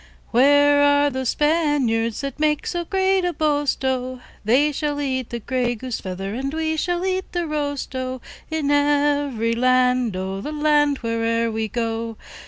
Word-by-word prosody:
Where 285 Hz, +3 st, +5 dB
are 285 Hz, 0 st, +4 dB
those 260 Hz, -2 st, -2 dB
Spaniards, 290 Hz, -8 st, +1 dB
That 275 Hz, 0 st, -5 dB
make 300 Hz, -1 st, +1 dB
so 345 Hz, -1 st, -2 dB
great 380 Hz, +1 st, +1 dB
a 355 Hz, 0 st, 0 dB
boast, 290 Hz, -4 st, 0 dB
O? 255 Hz, -1 st, -2 dB, 0.2 s
They 265 Hz, +8 st, +3 dB
shall 290 Hz, 0 st, -2 dB
eat 260 Hz, -3 st, -2 dB
the 235 Hz, -, -4 dB
grey 245 Hz, +1 st, -1 dB
goose 250 Hz, +1 st, -5 dB
feather, 195 Hz, +1 st, -5 dB
And 270 Hz, +4 st, -3 dB
we 315 Hz, 0 st, -1 dB
will 350 Hz, +1 st, -1 dB
eat 375 Hz, 0 st, -2 dB
the 350 Hz, -1 st, -1 dB
roast, 290 Hz, -3 st, -3 dB
O, 255 Hz, 0 st, -3 dB, 0.3 s
In 315 Hz, -3 st, -1 dB
every 285 Hz, -5 st, +2 dB
land, 250 Hz, -2 st, +2 dB
O, 190 Hz, +1 st, -4 dB
The 300 Hz, -, -5 dB
land 295 Hz, -1 st, +2 dB
where'er 230 Hz, 0 st, 0 dB
we 220 Hz, 0 st, -2 dB
go. 225 Hz, 0 st, -3 dB
275 Hz, 165 wpm, -22 LUFS, 235-295 Hz, 0.3 s, Where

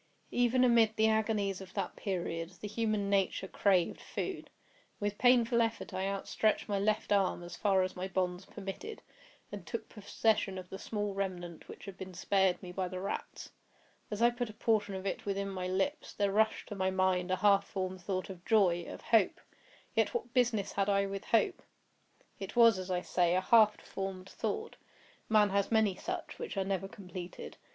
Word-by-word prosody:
Even 245 Hz, +1 st, +3 dB
amid 230 Hz, -3 st, +5 dB
the 220 Hz, 0 st, +4 dB
agonies 215 Hz, -3 st, +1 dB
of 185 Hz, -1 st, -11 dB
that -, -, -2 dB
period, 170 Hz, -4 st, -3 dB
the 210 Hz, -, -5 dB
human 215 Hz, -1 st, -1 dB
nature 195 Hz, -1 st, +1 dB
craved 185 Hz, -3 st, +2 dB
food. -, -, -5 dB, 0.5 s
With 205 Hz, 0 st, -2 dB
painful 240 Hz, -2 st, +5 dB
effort 225 Hz, 0 st, -2 dB
I 190 Hz, +1 st, -1 dB
outstretched 200 Hz, +2 st, 0 dB
my 200 Hz, -2 st, 0 dB
left 215 Hz, +1 st, 0 dB
arm 195 Hz, -3 st, +2 dB
as 175 Hz, 0 st, -8 dB
far 195 Hz, -2 st, +3 dB
as 185 Hz, -, -3 dB
my 185 Hz, +1 st, -3 dB
bonds 185 Hz, -1 st, -1 dB
permitted, 305 Hz, -, -7 dB, 0.5 s
and 205 Hz, -3 st, -6 dB
took 225 Hz, +7 st, -5 dB
possession 210 Hz, -2 st, 0 dB
of 180 Hz, -1 st, -8 dB
the 190 Hz, -, -6 dB
small 205 Hz, -2 st, -3 dB
remnant 180 Hz, -4 st, -4 dB
which -, -, -10 dB
had 195 Hz, -2 st, -9 dB
been 190 Hz, -1 st, -7 dB
spared 190 Hz, 0 st, +2 dB
me 180 Hz, -, -7 dB
by 185 Hz, 0 st, -2 dB
the 185 Hz, 0 st, -5 dB
rats. 195 Hz, -, -5 dB, 0.6 s
As 210 Hz, +2 st, -1 dB
I 240 Hz, -, +6 dB
put 240 Hz, -1 st, -3 dB
a -, -, -9 dB
portion 215 Hz, -4 st, +1 dB
of 190 Hz, 0 st, -6 dB
it 195 Hz, -, -3 dB
within 200 Hz, 0 st, -1 dB
my 185 Hz, -1 st, -3 dB
lips, 195 Hz, +12 st, -1 dB
there 200 Hz, -1 st, +1 dB
rushed 220 Hz, +2 st, +1 dB
to 205 Hz, -, -5 dB
my 190 Hz, -1 st, +1 dB
mind 185 Hz, -1 st, +1 dB
a 185 Hz, -, +2 dB
half 200 Hz, 0 st, +4 dB
formed 185 Hz, -1 st, -4 dB
thought 185 Hz, +1 st, -3 dB
of 175 Hz, -2 st, -11 dB
joy—of 185 Hz, -6 st, +2 dB
hope. 220 Hz, -5 st, +3 dB, 0.5 s
Yet -, -, +1 dB
what 255 Hz, -, -3 dB
business 240 Hz, -5 st, +2 dB
had 195 Hz, 0 st, 0 dB
I 200 Hz, 0 st, +3 dB
with 195 Hz, 0 st, -5 dB
hope? 235 Hz, -, +2 dB, 0.8 s
It 195 Hz, +2 st, -6 dB
was, 230 Hz, -4 st, +6 dB
as 185 Hz, 0 st, -6 dB
I 180 Hz, -1 st, 0 dB
say, 175 Hz, -1 st, +2 dB
a 185 Hz, -, +2 dB
half 215 Hz, +1 st, +5 dB
formed 195 Hz, -1 st, -5 dB
thought—man 210 Hz, -2 st, -2 dB
has 200 Hz, +1 st, +1 dB
many 220 Hz, -3 st, +4 dB
such, 360 Hz, -, -5 dB
which 470 Hz, -, -5 dB
are 190 Hz, -, +1 dB
never 195 Hz, -1 st, -1 dB
completed. 180 Hz, -2 st, -8 dB
195 Hz, 185 wpm, -32 LUFS, 185-220 Hz, 0.8 s, I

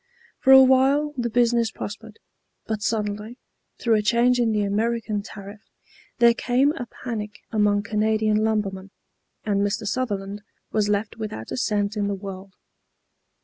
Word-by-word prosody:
For 265 Hz, -, +3 dB
a 265 Hz, 0 st, +10 dB
while 270 Hz, +3 st, +3 dB
the 240 Hz, -2 st, -2 dB
business 235 Hz, -1 st, +2 dB
prospered, 220 Hz, +1 st, -8 dB, 0.5 s
but 220 Hz, -1 st, -3 dB
suddenly, 210 Hz, +1 st, -2 dB, 0.4 s
through 230 Hz, -, +1 dB
a -, -, +1 dB
change 235 Hz, +4 st, +3 dB
in 235 Hz, -2 st, +2 dB
the 210 Hz, -1 st, +1 dB
American 215 Hz, +1 st, -1 dB
tariff, 200 Hz, 0 st, -10 dB, 0.6 s
there 235 Hz, -1 st, +6 dB
came 255 Hz, +4 st, +2 dB
a 265 Hz, -6 st, -6 dB
panic 215 Hz, -4 st, -6 dB
among 205 Hz, -1 st, +2 dB
Canadian 215 Hz, 0 st, +1 dB
lumbermen, 200 Hz, -3 st, -1 dB, 0.5 s
and 200 Hz, -2 st, 0 dB
Mr. 205 Hz, +2 st, -1 dB
Sutherland 205 Hz, -3 st, -3 dB, 0.3 s
was 210 Hz, -1 st, +1 dB
left 205 Hz, +1 st, -1 dB
without 205 Hz, -, -6 dB
a -, -, -2 dB
cent 210 Hz, -3 st, 0 dB
in 205 Hz, -1 st, 0 dB
the 200 Hz, -, -1 dB
world. 195 Hz, 0 st, -9 dB
215 Hz, 145 wpm, -24 LUFS, 205-235 Hz, 0.6 s, a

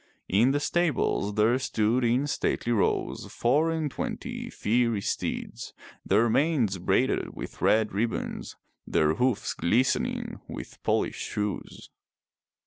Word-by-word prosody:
In 110 Hz, +7 st, +4 dB
the 145 Hz, +2 st, +2 dB
stables 145 Hz, -, 0 dB
there 110 Hz, +4 st, +3 dB
stood 115 Hz, -1 st, +1 dB
in 120 Hz, +4 st, +2 dB
stately 125 Hz, -4 st, -1 dB
rows 110 Hz, -4 st, 0 dB
four 145 Hz, +7 st, +2 dB
and 160 Hz, -3 st, -1 dB
twenty -, -, -5 dB
fiery 115 Hz, 0 st, +1 dB
steeds, 80 Hz, -, -4 dB, 0.3 s
their 105 Hz, +5 st, +3 dB
manes 120 Hz, -, +2 dB
braided 85 Hz, -, +1 dB
with -, -, -8 dB
red 110 Hz, 0 st, +3 dB
ribbons, 115 Hz, +3 st, -2 dB, 0.3 s
their 75 Hz, 0 st, +2 dB
hoofs 125 Hz, +5 st, 0 dB
glistening 120 Hz, +9 st, 0 dB
with -, -, -8 dB
polished -, -, -1 dB
shoes. 105 Hz, -2 st, -4 dB
115 Hz, 120 wpm, -27 LUFS, 105-130 Hz, 0.3 s, In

